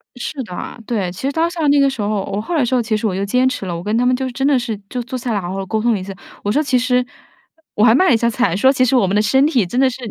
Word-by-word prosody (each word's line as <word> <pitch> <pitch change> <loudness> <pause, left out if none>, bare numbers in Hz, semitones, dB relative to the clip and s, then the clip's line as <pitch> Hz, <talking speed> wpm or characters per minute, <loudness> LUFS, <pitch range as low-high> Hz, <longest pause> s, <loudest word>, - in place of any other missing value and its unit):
是 265 +3 -5
的， 215 +2 -7
对。 200 -7 -1
其 180 - -10
实 - - 0
当 325 +3 0
下 330 -3 -2
那 285 0 +4
个 275 0 +4
时 265 -5 -5
候， 205 -1 -1
我 200 +1 -2
后 340 +10 -4
来 290 -6 +2
说 250 0 +1
其 220 -2 -1
实 220 - -4
我 190 - -2
就 195 - -2
坚 250 +6 +2
持 255 - -3
了， 175 -2 -3
我 170 - -6
跟 210 +3 -1
他 245 - +2
们 250 0 +3
就 260 +1 -3
真 270 +2 -2
的 285 - +3
是 235 -4 -3
就 250 - -3
坐 255 +2 -5
下 245 -1 -4
来 220 - 0
了 200 - -1
好 175 +1 -4
好 195 0 -4
沟 220 +3 -2
通 235 +1 +2
了 205 - -1
一 - - -6
下。 195 +1 -7 0.3
我 205 - 0
说 295 +8 +2
其 270 -3 +1
实 250 0 +1 0.7
我 210 - +2
还 220 - +6
卖 370 +10 +4
了 - - +5
一 - - +4
下 235 +1 +1
惨， 235 -5 0
说 260 +6 +5
其 260 -2 +1
实 255 +1 +2
我 240 -6 +4
们 190 +2 -1
的 210 - +4
身 265 +6 +3
体 260 - +2
真 240 +8 -2
的 265 0 +4
是 250 - -7
240 Hz, 380 characters per minute, -18 LUFS, 205-260 Hz, 0.7 s, 还